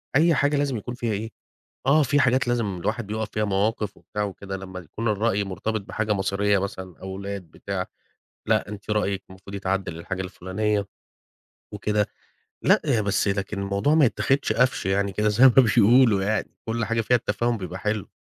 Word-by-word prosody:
أي 165 Hz, +3 st, +5 dB
حاجة 145 Hz, +1 st, +2 dB
لازم 140 Hz, -3 st, 0 dB
يكون 120 Hz, +3 st, -6 dB
فيها 120 Hz, -3 st, -2 dB
إيه؟ 110 Hz, +2 st, -3 dB, 0.6 s
آه، 150 Hz, +3 st, +5 dB
في 145 Hz, +1 st, +2 dB
حاجات 130 Hz, 0 st, +3 dB
لازم 115 Hz, -6 st, 0 dB
الواحد 110 Hz, +6 st, -2 dB
بيُقف 110 Hz, +1 st, -3 dB
فيها، 105 Hz, -, 0 dB
مواقف 105 Hz, +1 st, 0 dB
وبتاع 105 Hz, -1 st, -4 dB
وكده 100 Hz, 0 st, -5 dB
لما 95 Hz, -1 st, -8 dB
يكون 105 Hz, +7 st, -4 dB
الرأي 105 Hz, -1 st, +1 dB
مرتبط 100 Hz, +3 st, -3 dB
بحاجة 105 Hz, +2 st, -2 dB
مصيرية 100 Hz, +1 st, +1 dB
مثلًا 95 Hz, -2 st, -5 dB
أولاد 100 Hz, +1 st, -5 dB
بتاع، 95 Hz, +1 st, -4 dB, 0.6 s
لأ 110 Hz, -1 st, +2 dB
أنتِ 105 Hz, +1 st, -8 dB
رأيك 100 Hz, -2 st, 0 dB
المفروض 95 Hz, +1 st, -11 dB
يتعدِّل 95 Hz, -2 st, -2 dB
للحاجة 95 Hz, +3 st, -4 dB
الفلانية 100 Hz, +3 st, -2 dB, 0.9 s
وكده، 105 Hz, 0 st, 0 dB, 0.6 s
لأ -, -, +5 dB
هي 110 Hz, -, +2 dB
بس 100 Hz, +1 st, +1 dB
لكن 100 Hz, 0 st, -2 dB
الموضوع 100 Hz, +10 st, +1 dB
ما 155 Hz, -3 st, +6 dB
يتاخدش 135 Hz, +3 st, +1 dB
قفش 125 Hz, -4 st, +1 dB
يعني 100 Hz, +1 st, +1 dB
كده 105 Hz, +2 st, +1 dB
زي 105 Hz, +5 st, +3 dB
ما 135 Hz, -, +10 dB
بيقولوا 115 Hz, -2 st, +6 dB
يعني 110 Hz, +2 st, -1 dB
كل 115 Hz, 0 st, -1 dB
حاجة 115 Hz, +2 st, 0 dB
فيها 125 Hz, +3 st, +3 dB
التفاهم 120 Hz, +2 st, -1 dB
بيبقى 90 Hz, -1 st, -6 dB
حلو. 105 Hz, 0 st, -2 dB
105 Hz, 175 wpm, -24 LUFS, 100-115 Hz, 0.9 s, ما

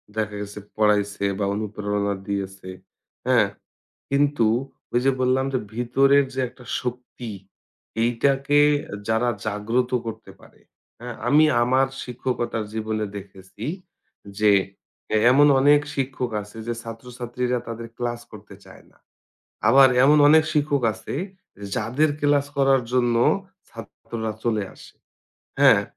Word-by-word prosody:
দেখা 105 Hz, -1 st, -2 dB
গেছে 105 Hz, 0 st, -7 dB, 0.2 s
পড়াইছে 105 Hz, -2 st, +1 dB, 0.2 s
বা 100 Hz, -, +1 dB
অনুপ্রেরণা 105 Hz, -1 st, -2 dB
দিয়েছে। 95 Hz, -1 st, -4 dB, 0.6 s
হ্যাঁ? -, -, +4 dB, 0.6 s
কিন্তু 140 Hz, -3 st, +2 dB, 0.5 s
ওই 120 Hz, -, +2 dB
যে 135 Hz, -, +5 dB
বললাম 130 Hz, +1 st, +2 dB
যে 130 Hz, -, +1 dB, 0.2 s
ভিতরের 135 Hz, +4 st, +3 dB
যে 130 Hz, -, -1 dB
একটা 125 Hz, +1 st, -17 dB, 0.2 s
শক্তি, 125 Hz, -1 st, -6 dB, 0.7 s
এইটাকে 135 Hz, +4 st, +2 dB, 0.2 s
এ -, -, -9 dB
যারা 110 Hz, +2 st, +1 dB, 0.2 s
জাগ্রত 115 Hz, +4 st, -1 dB, 0.2 s
করতে 115 Hz, -, -7 dB
পারে। -, -, -20 dB, 0.4 s
হ্যাঁ? 120 Hz, 0 st, -7 dB
আমি 150 Hz, +2 st, +6 dB, 0.2 s
আমার 130 Hz, +2 st, +3 dB, 0.2 s
শিক্ষকতার 120 Hz, -2 st, -3 dB
জীবনে 110 Hz, -1 st, -2 dB
দেখেছি 95 Hz, +1 st, -10 dB, 0.7 s
যে 105 Hz, -1 st, +4 dB, 0.6 s
এ -, -, +4 dB
এমন 145 Hz, +3 st, +6 dB
অনেক 145 Hz, +2 st, +5 dB
শিক্ষক 130 Hz, -2 st, -2 dB
আছে 105 Hz, +2 st, -14 dB
যে 120 Hz, -, -1 dB
ছাত্রছাত্রীরা 125 Hz, +1 st, -4 dB
তাদের 115 Hz, 0 st, -6 dB
ক্লাস 120 Hz, -1 st, -3 dB
করতে -, -, -12 dB
চায় -, -, -16 dB
না। -, -, -28 dB, 0.7 s
আবার 135 Hz, +3 st, +7 dB, 0.2 s
এমন 150 Hz, +2 st, +6 dB
অনেক 160 Hz, +1 st, +7 dB
শিক্ষক 145 Hz, -2 st, +1 dB
আছে -, -, -7 dB, 0.5 s
এ -, -, -11 dB
যাদের 125 Hz, +7 st, +1 dB
ক্লাস 145 Hz, -1 st, +2 dB
করার 135 Hz, -2 st, +3 dB
জন্য 120 Hz, -2 st, +2 dB, 0.5 s
ছাত্ররা 110 Hz, -2 st, -7 dB
চলে 110 Hz, -3 st, 0 dB
আসে। -, -, -15 dB, 0.7 s
হ্যাঁ? -, -, +6 dB
120 Hz, 125 wpm, -23 LUFS, 110-135 Hz, 0.7 s, আবার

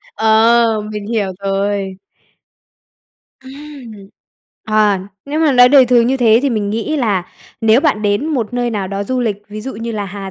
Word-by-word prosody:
Ờ, 225 Hz, 0 st, +3 dB
mình 210 Hz, -1 st, -6 dB
hiểu 215 Hz, -4 st, -1 dB
rồi. 195 Hz, 0 st, -2 dB, 1.5 s
Ừm. 275 Hz, -3 st, -11 dB, 0.7 s
À, 215 Hz, -3 st, +2 dB, 0.2 s
nếu 295 Hz, +3 st, -3 dB
mà 310 Hz, -3 st, +3 dB
nói 245 Hz, -1 st, +6 dB
đời 265 Hz, -2 st, +6 dB
thường 240 Hz, -1 st, +3 dB
như 265 Hz, +2 st, +1 dB
thế 230 Hz, -3 st, +4 dB
thì 280 Hz, -, 0 dB
mình 210 Hz, -3 st, -2 dB
nghĩ 230 Hz, +9 st, -2 dB
là 210 Hz, -9 st, 0 dB, 0.4 s
nếu 225 Hz, +2 st, +4 dB
bạn 280 Hz, -9 st, 0 dB
đến 205 Hz, +6 st, 0 dB
một 250 Hz, -9 st, -2 dB
nơi 245 Hz, -1 st, -1 dB
nào 200 Hz, -4 st, -3 dB
đó 200 Hz, +1 st, -4 dB
du 255 Hz, +4 st, -2 dB
lịch, 220 Hz, -5 st, -1 dB
ví 215 Hz, +1 st, -8 dB
dụ 265 Hz, +4 st, -6 dB
như 230 Hz, +2 st, -5 dB
là 210 Hz, -2 st, -3 dB
Hà 195 Hz, 0 st, -7 dB
225 Hz, 180 wpm, -16 LUFS, 205-250 Hz, 1.5 s, nói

